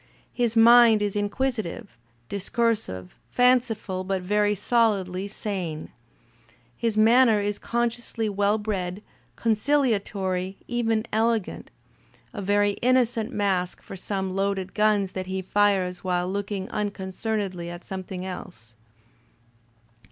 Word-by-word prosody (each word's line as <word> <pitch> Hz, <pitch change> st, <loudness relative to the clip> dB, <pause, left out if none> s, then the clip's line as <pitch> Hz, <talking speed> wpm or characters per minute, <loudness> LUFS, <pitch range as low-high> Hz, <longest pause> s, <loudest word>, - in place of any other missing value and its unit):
His 235 Hz, -2 st, 0 dB
mind 230 Hz, -1 st, +7 dB
is 205 Hz, -1 st, -2 dB
inquisitive, 220 Hz, -1 st, -2 dB, 0.3 s
discursive, 200 Hz, -, -1 dB, 0.2 s
fanciful, 235 Hz, -6 st, +2 dB
but 190 Hz, -1 st, -2 dB
very 210 Hz, +2 st, +2 dB
solidly 200 Hz, -4 st, +1 dB
sane. 185 Hz, -7 st, -5 dB, 0.8 s
His 225 Hz, -, -1 dB
manner 225 Hz, 0 st, +5 dB
is 205 Hz, 0 st, -2 dB
consciously 235 Hz, -1 st, -2 dB
well 205 Hz, +1 st, +1 dB
bred, 200 Hz, -2 st, -3 dB, 0.3 s
conciliatory, 205 Hz, -6 st, 0 dB
even 225 Hz, -2 st, 0 dB
elegant 225 Hz, -2 st, 0 dB, 0.3 s
— -, -, -32 dB
a 205 Hz, -, -5 dB
very 205 Hz, +1 st, +2 dB
innocent 245 Hz, -2 st, +2 dB
mask 190 Hz, -5 st, -1 dB
for -, -, -9 dB
some 190 Hz, 0 st, -3 dB
loaded 195 Hz, 0 st, -1 dB
guns 210 Hz, -2 st, +2 dB
that 185 Hz, 0 st, -5 dB
he 190 Hz, 0 st, -2 dB
fires 190 Hz, -2 st, +1 dB
while 180 Hz, -1 st, 0 dB
looking 200 Hz, 0 st, -3 dB
unconcern 210 Hz, +1 st, -2 dB
edly 185 Hz, -4 st, -4 dB
at 175 Hz, 0 st, -9 dB
something 185 Hz, -1 st, -6 dB
else. 115 Hz, -, -9 dB
205 Hz, 115 wpm, -25 LUFS, 190-225 Hz, 0.8 s, mind